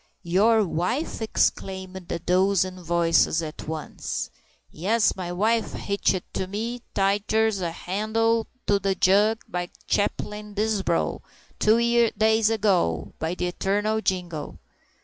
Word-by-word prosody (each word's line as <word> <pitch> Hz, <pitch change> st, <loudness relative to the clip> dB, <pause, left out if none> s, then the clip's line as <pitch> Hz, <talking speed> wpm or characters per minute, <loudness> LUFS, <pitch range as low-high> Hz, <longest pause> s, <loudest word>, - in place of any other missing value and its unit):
"Your 210 Hz, +5 st, +3 dB
wife!" 205 Hz, -, -2 dB
exclaimed 190 Hz, -4 st, -1 dB
a -, -, 0 dB
dozen 185 Hz, +1 st, +1 dB
voices 170 Hz, -1 st, +2 dB
at 155 Hz, -1 st, -7 dB
once. 155 Hz, -1 st, -4 dB, 0.4 s
"Yes, 210 Hz, +7 st, +1 dB
my 180 Hz, -2 st, -5 dB
wife! 220 Hz, +5 st, +1 dB
Hitched 200 Hz, -2 st, 0 dB
to 190 Hz, -, -2 dB
me 230 Hz, +5 st, -4 dB
tighter'n 205 Hz, +1 st, +1 dB
a 175 Hz, -, -1 dB
handle 220 Hz, +6 st, 0 dB, 0.2 s
to 200 Hz, -1 st, +3 dB
the 195 Hz, 0 st, 0 dB
jug, 205 Hz, +5 st, +3 dB
by 175 Hz, 0 st, -3 dB, 0.2 s
Chaplain 210 Hz, 0 st, -2 dB
Disbrow, 205 Hz, -5 st, 0 dB, 0.4 s
two 235 Hz, +1 st, +4 dB
days 220 Hz, 0 st, +4 dB
ago, 185 Hz, -, +1 dB
by 160 Hz, +2 st, -2 dB
the 180 Hz, -, -2 dB
eternal 205 Hz, +4 st, 0 dB
jingo!" 175 Hz, -6 st, -3 dB
195 Hz, 120 wpm, -25 LUFS, 180-220 Hz, 0.4 s, two